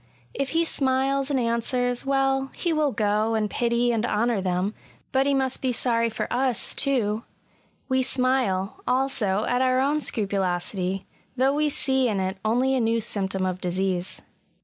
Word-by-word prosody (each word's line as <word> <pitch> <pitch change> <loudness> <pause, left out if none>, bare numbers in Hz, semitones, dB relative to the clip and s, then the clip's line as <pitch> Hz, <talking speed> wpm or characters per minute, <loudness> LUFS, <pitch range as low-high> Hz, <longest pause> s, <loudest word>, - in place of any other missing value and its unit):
If 275 -1 -2
he 335 - +3
smiles 270 -1 +1
and 275 -2 +1
answers, 245 +2 0
well, 270 0 +1
he 340 -2 -1
will 305 -2 +1
go 215 0 +1
and 215 -1 +1
pity 240 +2 +1
and 225 -2 0
honour 230 -2 +1
them 185 +2 -1 0.2
— - - -34
^but 270 +1 +3
he 280 - +3
must 265 -1 -1
be 260 - +1
sorry 230 -1 +1
for 220 - -3
us, 255 -1 0
too 225 -5 0 0.3
— - - -38
^we 260 -1 +2
smile, 250 -7 0
also, 245 -6 +1
at 245 +1 +1
our 255 0 +3
own 290 +3 +1
scrupulosity, 190 -3 -1 0.3
though 265 +2 +3
we 300 +1 +1
see 265 -2 +1
in 205 -3 -1
it 190 0 -2
only 245 +5 +2
a 260 - +2
new 230 0 +2
symptom 195 -4 -1
of 185 0 -3
disease. 185 0 -2
240 Hz, 170 wpm, -25 LUFS, 205-265 Hz, 0.3 s, he